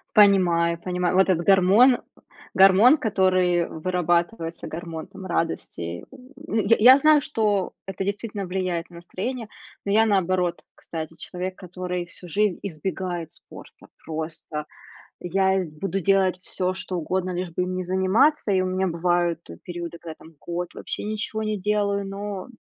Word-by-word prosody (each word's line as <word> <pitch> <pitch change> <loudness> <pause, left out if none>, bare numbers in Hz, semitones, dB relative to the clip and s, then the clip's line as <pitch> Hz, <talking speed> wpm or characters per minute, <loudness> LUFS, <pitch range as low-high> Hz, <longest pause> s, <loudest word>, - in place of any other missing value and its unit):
Понимаю, 175 -5 +5
понимаю, 180 -1 -1
вот 190 +1 +4
этот 170 -2 +1
гормон, 200 +7 +6 0.6
гормон, 195 +10 +7
который 185 -4 +2
вырабатывается, 175 +1 -1
гормон, 165 -1 -6
там, 190 -1 -11
радости. 90 - -3 0.4
Й 220 0 +2
я 255 +4 +9
знаю, 305 0 +5
что 210 -8 0
это 195 0 -4
действительно 205 0 -3
влияет 180 -2 -3
на 170 - -13
настроение, 215 +7 -5 0.4
но 200 - -1
я 220 +1 +5
наоборот, 185 -3 +1
кстати, 160 -1 -7
человек, 185 +1 -5
который 180 -1 -5
всю 180 +1 -14
жизнь 200 +2 0
избегает 175 -1 -4
спорта. - - -15 0.2
Просто, 155 -1 -5 0.5
и 175 - -6
я 190 +1 +2
буду 165 +5 -4
делать 190 -1 +2
всё, 185 0 -2
что 185 -1 -6
угодно, 185 +3 -2
лишь 180 0 -3
бы 180 +2 -1
им 185 0 -3
не 185 - -2
заниматься, 190 - +2
и 185 - +3
у - - 0
меня 185 +1 0
бывают 175 -1 0 0.2
периоды, 170 -1 -6
когда, 160 -2 -8
там, 160 +1 -16
год 175 0 -5
вообще - - -5
ничего 215 +1 -3
не 215 -1 -2
делаю, 200 0 0
но 200 0 -5
185 Hz, 150 wpm, -24 LUFS, 175-200 Hz, 0.6 s, я